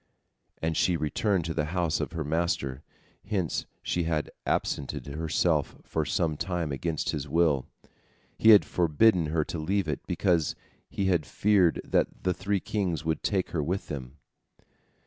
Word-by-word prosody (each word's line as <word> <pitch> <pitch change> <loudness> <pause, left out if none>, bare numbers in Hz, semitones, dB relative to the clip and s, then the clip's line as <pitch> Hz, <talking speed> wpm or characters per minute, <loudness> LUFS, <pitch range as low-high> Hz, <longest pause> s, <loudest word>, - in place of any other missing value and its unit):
And 80 0 0
she 90 +1 +2
returned 85 +4 0
to 85 - -2
the 75 -1 0
house 85 -3 +1
of - - -3
her 80 -2 -2
master, 75 -4 -1 0.5
whence 95 -7 -1 0.2
she 85 -1 0
had 80 -2 -1 0.2
absented 70 - -1
herself 75 +3 0
for - - -2
some 80 -3 0
time 85 -4 -2
against 80 +3 -2
his 75 0 -4
will. 80 -4 +2 0.7
He 110 - +4
had 105 -2 +9
forbidden 85 +1 +3
her 80 0 0
to 85 - -5
leave 95 +3 0
it, 75 -4 -1
because 85 -6 +1 0.3
he 100 - -2
had 90 -4 +2
feared 95 -5 +3
that - - 0
the 90 - +2
three 100 +3 -1
kings 90 -7 -2
would 80 -1 0
take 95 -3 0
her 80 - 0
with 90 +7 -2
them. 65 -1 -6
85 Hz, 160 wpm, -28 LUFS, 75-90 Hz, 0.7 s, had